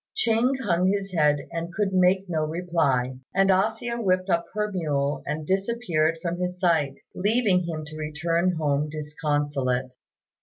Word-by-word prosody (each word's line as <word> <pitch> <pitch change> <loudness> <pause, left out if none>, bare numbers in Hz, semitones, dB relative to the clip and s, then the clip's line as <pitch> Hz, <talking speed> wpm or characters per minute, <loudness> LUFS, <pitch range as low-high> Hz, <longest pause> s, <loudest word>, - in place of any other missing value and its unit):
Ching 245 - +2
hung 180 -3 +2
his 195 0 0
head 150 -3 +2
and 170 +1 -4
could 195 0 -1
make 185 +1 +3
no 160 -3 -1
reply; 155 -6 0 0.2
and 195 0 +4
A 190 +3 +4
hsia 235 +1 -5
whipped 185 -1 +1
up 170 0 +2
her 210 0 -1
mule 145 -6 -1
and 150 +2 -3
disappeared 190 -5 0
from 175 0 -2
his 180 0 -3
sight, 160 -6 +2 0.2
leaving 205 -3 +2
him 155 -2 -4
to 150 +1 -10
return 165 +4 0
home 150 -1 0
disconsolate. 145 -4 -2
170 Hz, 155 wpm, -25 LUFS, 150-190 Hz, 0.2 s, and